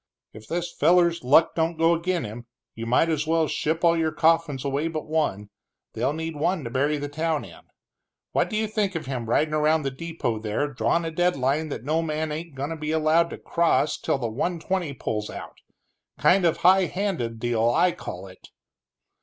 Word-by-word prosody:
"If 110 0 -12
this 175 +1 -3
feller's 170 +1 +3
luck 145 +6 +5
don't 165 0 0
go 165 +1 +4
ag'in' 175 0 -1
him, 115 +2 -8 0.3
you 115 0 -6
might 125 +7 +3
as 155 -2 -1
well 160 -1 +2
ship 160 +3 -1
all 170 -1 +5
your 160 -1 0
coffins 160 -4 +1
away 140 +3 0
but 155 -2 -4
one 150 -11 -1 0.4
they'll 125 +5 0
need 160 +1 -4
one 160 +2 0
to 115 - -6
bury 145 +4 +1
the 145 0 -4
town 155 +1 -2
in. - - -13 0.7
What - - +1
do 215 - -2
you 220 - +1
think 205 -3 -1
of 160 -2 -3
him 125 -4 -4
ridin' 150 +5 +2
around 155 +1 +2
the 135 - -2
depot 135 -6 -3
down - - -14
there, 110 +7 -1
drawin' 170 +6 +1
a 165 - -3
deadline 155 -3 0
that 140 - -5
no 155 +4 +1
man 155 -1 -2
ain't 160 0 -6
goin' 140 +3 -4
to - - -3
be 155 0 -4
allowed 160 +2 +3
to - - -7
cross 170 -2 +1
till - - -1
the 120 -3 -2
one 165 +10 -2
twenty 180 -3 -2
pulls 110 -4 -3
out? - - -9 0.6
Kind 185 0 +4
of 165 - +2
high 185 +1 +5
handed 170 - -3
deal, 115 -1 +1
I 175 +9 +3
call 90 - -8
it!" 95 -1 -14
155 Hz, 205 wpm, -25 LUFS, 135-170 Hz, 0.7 s, luck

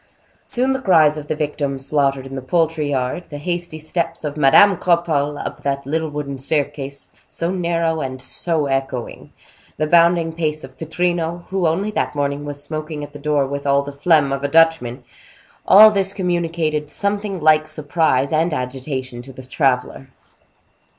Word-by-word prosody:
Soon 260 +2 +1
the 265 - -3
cries 160 - +4
of 150 -1 -7
the 155 - -1
victims 145 -3 -3
slaughtered 140 -3 0
in 135 - -9
the 135 - -4
poultry 160 +1 0
yard, 130 +5 -2
the 145 - -7
hasty 175 +1 -4
steps 160 +2 -3
of 150 -1 -4
Madame 155 +7 +5
Cropole 160 -5 +1
up - - -6
that 140 -1 -2
little 160 +3 -2
wooden 145 -2 -5
staircase, 140 0 -3 0.2
so 170 +1 -2
narrow 170 -3 0
and 130 -1 -5
so 155 +4 -1
echoing; 135 -3 -4 0.5
the 155 - 0
bounding 170 0 +3
pace 155 -2 -2
of 130 0 -11
Pittrino, 170 +2 -2
who 190 -3 0
only 190 +7 -1
that 210 - -2
morning 145 0 -2
was 145 0 -6
smoking 155 -1 -5
at 145 0 -9
the 145 - -9
door 145 -1 +1
with 140 +1 -5
all 140 0 +3
the 145 - -7
phlegm 145 0 +2
of 140 0 -4
a - - +1
Dutchman; 145 -5 +2 0.6
all 215 +3 +9
this 195 -1 0
communicated 165 -5 -1
something 200 0 -2
like 155 0 +4
surprise 145 -3 0
and 160 +1 +1
agitation 130 -1 -5
to 135 - -12
the 130 0 -11
traveler. 130 0 -1
150 Hz, 170 wpm, -20 LUFS, 140-170 Hz, 0.6 s, all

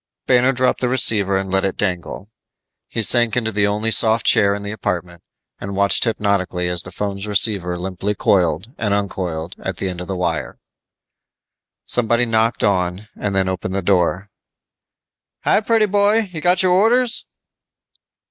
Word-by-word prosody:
Banner 125 +1 +3
dropped 130 0 0
the 125 - 0
receiver 105 -6 +2
and 95 -1 -4
let 95 0 +1
it 95 - -2
dangle. 95 +1 -4 0.6
He 115 - -3
sank 120 +2 +3
into 110 -2 0
the 100 -1 +1
only 105 +2 -1
soft 110 0 +3
chair 100 0 +3
in 100 - -7
the 100 - -5
apartment 90 -5 -4 0.4
and 100 0 -6
watched 100 +1 +1
hypnotically 100 -5 -1
as 90 -1 +1
the - - -11
phone's 100 0 -5
receiver 100 -4 +3
limply 95 +3 -4
coiled 90 - 0
and 105 -3 0
uncoiled 90 -4 -4
at 95 -2 -5
the 95 - -3
end 90 -1 -6
of 90 - -7
the 95 - -4
wire. 85 -4 -3 1.3
Somebody 120 0 +3
knocked 115 0 0
on, 95 +1 -1
then 95 -2 -1
opened 95 0 -4
the 100 - -2
door. 95 +1 0 1.1
"Hi, - - +2
pretty 225 0 +2
boy, 205 +1 +1
you 160 - -5
got 180 +2 +2
our 185 - +2
orders?" 230 +6 +2
100 Hz, 160 wpm, -19 LUFS, 95-120 Hz, 1.3 s, Banner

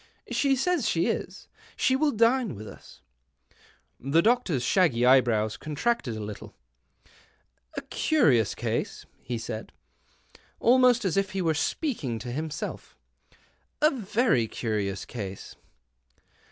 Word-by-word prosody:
She 275 -1 +2
says 285 -3 0
she 165 0 +1
is. - - -3 0.3
She 260 - +2
will 300 +3 +2
dine 230 - +2
with 105 +2 -9
us." - - -14 1.0
The 145 +6 +2
doctor's 220 - +2
shaggy 130 -7 +3
eyebrows 120 -4 +3
contracted 155 - -2
a 110 - -5
little. 105 0 -8 0.6
" - - -27
A - - -3
curious 130 - +2
case," - - -3 0.2
he 120 - -4
said, 110 -1 -6 0.9
almost 250 -1 +4
as 190 0 0
if 195 0 0
he 195 - -1
were 165 -1 +2
speaking 150 - -2
to 120 +2 -6
himself, 155 +4 -5 0.4
" - - -33 0.4
a 305 - +6
very 215 - +1
curious 105 -4 -3
case." 100 -5 -7
160 Hz, 125 wpm, -27 LUFS, -, 1.0 s, a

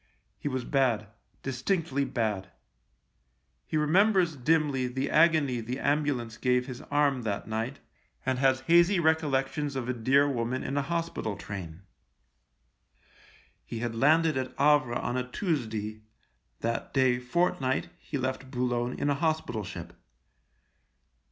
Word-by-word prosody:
He - - -4
was 130 -3 -2
bad 120 -7 +1 0.2
— - - -40
distinctly 140 +2 -1
bad. 105 -7 -2 1.2
He - - -1
remembers 180 +2 +3
dimly 140 -1 +1
the 130 +2 -2
agony 155 -6 +4
the 120 +3 -4
ambulance 140 -6 0
gave 125 -1 +2
his 130 0 -7
arm 145 -3 +2
that 105 -4 -3
night, 110 +5 -3 0.5
and 130 -1 0
has 130 -1 +3
hazy 170 +6 +4
recollections 150 -3 +1
of 130 -2 -3
a 125 - 0
dear 135 +5 +3
woman 130 -1 -1
in 140 - -3
a 145 - +2
hospital 165 -9 -3
train. 95 -3 -7 1.8
He 115 - -6
had 120 0 -2
landed 155 +5 +3
at 130 0 -4
Havre 145 -4 +4
on 120 +1 -2
a 125 0 -3
Tuesday; 110 - -2 0.6
that 115 +4 -3
day 130 -2 +3
fortnight 130 0 0
he 145 - -5
left 130 0 -3
Boulogne 125 -1 -1
in - - -1
a 145 - +3
hospital 155 -7 -1
ship. - - -8
130 Hz, 135 wpm, -28 LUFS, 120-150 Hz, 1.8 s, agony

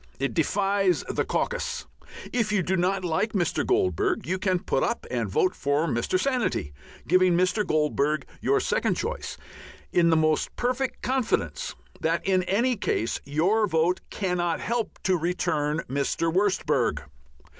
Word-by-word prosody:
It 140 0 -1
defies 195 +2 +1
the - - 0
caucus. 485 -1 -2 0.5
If 230 -3 +1
you 200 -3 +2
do 190 +3 0
not 185 +1 0
like 175 +6 0
Mr. 175 -5 0
Goldbug 385 -1 +1
you 185 +1 -1
can 185 -1 +1
put - - -1
up - - -1
and - - -1
vote 405 -5 +2
for 145 +3 0
Mr. 135 +6 0
Sanity, 245 - -1 0.3
giving 185 0 +4
Mr. 185 +4 +2
Goldbug 150 -3 +1 0.2
your - - +2
second - - 0
choice, - - -4 0.6
in 170 -1 +4
the 160 - +4
most 155 -1 +1
perfect 255 +2 -2
confidence 235 - -1 0.2
that 165 +1 0
in 185 -1 +3
any 235 +7 +2
case 115 - -1
your 185 +10 +2
vote 165 +1 +1
cannot 180 -4 -1
help 235 -1 -2
to 190 -2 +3
return 160 -3 0
Mr. 140 +5 -1
Wurstberg. 190 - +1
185 Hz, 145 wpm, -26 LUFS, 160-215 Hz, 0.6 s, giving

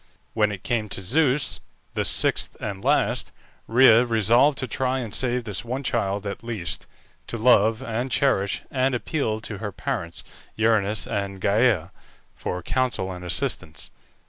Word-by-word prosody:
When 105 -2 +2
it 95 -3 -7
came 115 -3 -1
to 95 - -4
Zeus, 140 - +2 0.3
the - - 0
sixth - - +1
and 100 -2 -5
last, - - +1 0.4
Rhea 120 -1 +7
resolved 120 +5 +3
to 130 - -1
try 130 +2 0
and 115 -5 -5
save 125 0 0
this 105 -3 -3
one 130 +4 -4
child 100 -5 -1
at 100 +2 -5
least, 105 -8 -3 0.4
to 115 - -4
love 110 -1 +4
and 115 +3 -2
cherish, 100 -7 +1
and 130 -1 +1
appealed 115 -5 -2
to 105 -5 -6
her 105 -1 -4
parents, 85 -2 -4 0.3
Uranus 110 -1 +2
and 100 -1 -3
Gæa, 100 -4 +2 0.4
for 90 -1 -4
counsel 125 -7 -1
and 90 -1 -8
assistance. 80 -3 -2
110 Hz, 150 wpm, -24 LUFS, 100-125 Hz, 0.4 s, Rhea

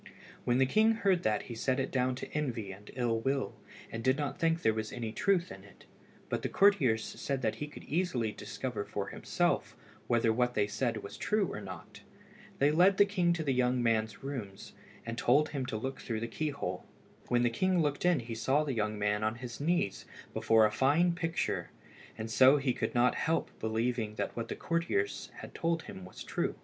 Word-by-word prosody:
When 120 0 +3
the 135 - +5
king 220 +11 +4
heard 195 -6 +2
that 105 -1 +1
he 120 - -7
set 130 +3 0
it 135 - -2
down 130 -1 +1
to - - -8
envy 120 -9 -2
and 100 +2 -12
ill 120 -3 +1
will, 135 +3 -1 0.4
and 115 0 -5
did 130 +2 +3
not 145 -2 -3
think 165 0 +1
there 110 - +4
was 110 0 -3
any 115 -3 -4
truth 185 - +1
in - - -10
it, - - -17 0.4
but - - -2
the - - -2
courtiers 145 - +4
said 135 -2 -3
that 110 - 0
he 150 - -4
could 150 - -11
easily 140 -9 0
discover 110 0 -4
for - - -4
himself - - -1 0.3
whether 115 -1 +3
what 125 +1 +1
they 105 - +3
said 115 +1 -2
was 100 - -8
true 210 -4 0
or - - -5
not. 95 -4 -9 0.6
They 145 +2 +4
led 185 +5 +5
the 205 - +7
king 185 -4 +1
to 165 -2 -2
the 140 -3 +1
young 125 -1 +2
man's 110 +1 0
rooms, 120 -9 -6 0.3
and 115 0 -4
told 145 +5 +4
him 135 -4 -3
to 115 -4 -2
look 130 +5 -4
through 110 -2 -3
the 115 - -2
key 155 +6 -2
hole. 90 -11 -4 0.4
When 120 0 +2
the 120 - +2
king 185 +8 +2
looked 145 -3 0
in 175 -6 +3
he 115 0 -6
saw 135 +6 +2
the 145 -3 -2
young 110 -2 -1
man 105 +1 0
on 110 +1 0
his 120 +1 -7
knees 155 - 0 0.3
before 110 -1 +4
a 105 - +2
fine 150 +10 +3
picture, 165 - -2 0.5
and 110 +1 -5
so 130 +5 +7
he 135 -3 +1
could - - -3
not 120 +1 +4
help 165 +1 0
believing 110 0 -1
that - - -3
what 115 - -3
the - - -4
courtiers 165 -12 -1
had - - -9
told 165 -1 -1
him 95 - -9
was 90 - -9
true. - - -2
125 Hz, 210 wpm, -31 LUFS, 110-150 Hz, 0.6 s, the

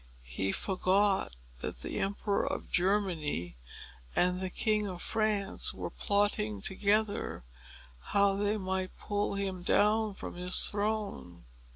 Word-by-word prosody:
He 95 +11 -2
forgot 190 - +1 0.2
that - - -5
the - - -4
Emperor 200 +1 -1
of - - -4
Germany 175 - 0 0.6
and 180 +1 +2
the 185 - -2
King 210 +2 0
of 180 -2 -5
France 215 -3 -1
were - - -5
plotting 200 - +1
together 205 - 0 0.6
how 200 - +2
they 205 +2 0
might 190 -1 -3
pull 205 -1 -2
him 195 -2 -3
down 210 +3 +2
from - - -7
his 180 +1 +7
throne. 205 - -3
195 Hz, 125 wpm, -31 LUFS, 180-205 Hz, 0.6 s, his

